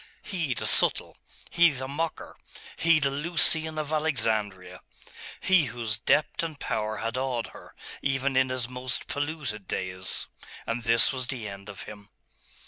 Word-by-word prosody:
He, 165 -10 -2
the - - -3
subtle! - - +3 0.4
he, 170 0 +6
the 130 -2 -5
mocker! 160 +4 -3 0.4
he, 165 -1 +4
the 140 -2 +1
Lucian 160 +1 +2
of 155 0 -2
Alexandria! 110 - -1 0.6
he 185 -5 +4
whose 115 -4 -3
depth 150 - +2
and 160 -3 -4
power 110 -1 -2
had 115 +3 -2
awed 130 -3 -1
her, - - -13 0.3
even 135 0 0
in 130 0 +4
his 130 -2 -1
most 125 0 -4
polluted 145 - -3
days.... 95 0 -2 0.4
And 115 +1 -2
this 115 +3 +5
was 130 -2 -4
the 120 -6 -4
end 100 0 -9
of 100 - -8
him.... 105 -1 -11
130 Hz, 150 wpm, -27 LUFS, 110-150 Hz, 0.6 s, he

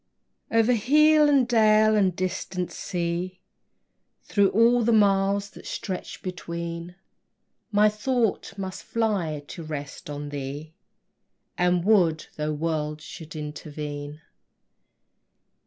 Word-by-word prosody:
O'er 225 0 +4
hill, 300 +6 +5
and 270 -4 +4
dale, 215 -2 +4
and 190 -4 +2
distant 180 0 -3
sea, 175 +1 -3 0.8
Through 200 -2 +2
all 235 +3 +4
the 235 - +2
miles 200 -1 +3
that - - -12
stretch 185 -2 -5
between, 170 -1 -5 0.8
My 210 0 +5
thought 215 -2 -1
must 190 -1 -5
fly 190 -10 -1
to - - -7
rest 150 -3 -7
on 145 0 -5
thee, 145 +2 -6 0.8
And 180 0 +1
would, 175 -7 +3
though 150 0 -2
worlds 150 -1 -2
should 160 -1 -10
intervene. 150 0 -6
180 Hz, 105 wpm, -25 LUFS, 155-215 Hz, 0.8 s, hill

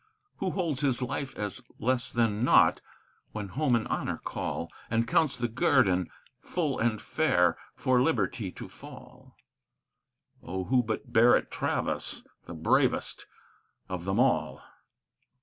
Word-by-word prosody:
Who 190 - -1
holds 165 -8 -1
his 135 -3 +2
life 135 +2 -4
as 105 -3 -3 0.2
less 125 +1 0
than 115 -2 +1
naught - - +5 0.5
when 105 -2 -5
home 130 +5 +1
and 115 - -1
honor - - -2
call, - - -4 0.2
And 115 +1 +1
counts 140 +1 +2
the 120 -1 -1
guerdon 110 - +2 0.3
full 155 -7 -2
and 110 -2 +1
fair 90 - +2 0.2
for 130 -1 +2
liberty 120 - 0
to - - -8
fall? - - -13 1.1
Oh, 95 +2 -4
who 125 +6 +3
but 110 -2 -5
Barrett 120 +2 +5
Travis, - - -2 0.2
the 85 - -8
bravest 80 - +1 0.6
of 90 -2 -4
them 95 +3 0
all! 130 0 +1
120 Hz, 130 wpm, -29 LUFS, 105-130 Hz, 1.1 s, naught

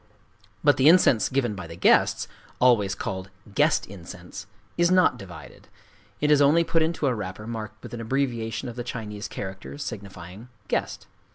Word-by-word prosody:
But 145 -1 +5
the 135 +3 +6
incense 160 -10 +5
given 130 -4 0
by 95 -4 -7
the 85 - -9
guests,—always 105 +2 +2
called 95 0 -5 0.2
"guest - - +3
incense"—is 100 - -5
not 185 0 +4
divided: 90 -4 -12 0.5
it 150 0 +2
is 145 -1 +5
only 150 +4 +5
put 165 0 +1
into 160 -1 0
a 130 - +2
wrapper 105 -1 -6
marked 110 -1 -7
with - - -9
an 115 - -5
abbreviation 120 -1 -2
of 120 - -7
the 120 - -3
Chinese 105 -4 -6
character 95 +6 -7
signifying 100 -3 -8 0.2
"guest." - - -2
115 Hz, 155 wpm, -25 LUFS, 100-140 Hz, 0.5 s, the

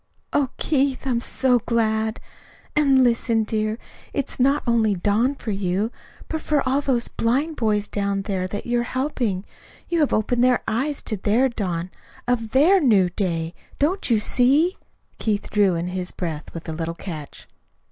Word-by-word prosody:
"Oh, 280 -3 +2
Keith, 275 -3 0
I'm 245 -3 0
so 250 0 +2
glad! 220 -1 0 0.6
And, 275 -3 +5
listen, 230 -2 +2
dear. 215 0 -1 0.4
It's 280 -2 -3
not 275 +3 +3
only 225 -4 +2
dawn 210 +9 +1
for 230 - -5
you, 195 +3 -1 0.4
but 315 -1 -3
for 290 -3 0
all 270 +2 +2
those 250 -4 0
blind 275 +8 0
boys 210 -3 +1
down 200 -1 -1
there 190 -2 -2
that 205 +2 -5
you 240 0 +1
are 240 +2 -3
helping. 240 -9 -1 0.4
You 340 - +1
have 295 - +2
opened 240 +3 +1
their 250 -1 +3
eyes 275 +6 -1
to 215 - -2
the 235 +6 +2
dawn 180 -3 -2 0.4
of 235 -3 0
THEIR 310 - +5
new 205 - +4
day. 170 -3 -2 0.2
Don't 335 +5 +1
you 225 -3 +4
see?" 275 - +3 0.4
Keith 210 -2 -1
drew 200 -4 +3
in 170 +2 -2
his 180 0 -4
breath 160 -4 -5
with 165 0 -8
a 160 - -3
little 165 +1 -3
catch. 160 -6 -8
230 Hz, 165 wpm, -23 LUFS, 200-265 Hz, 0.6 s, And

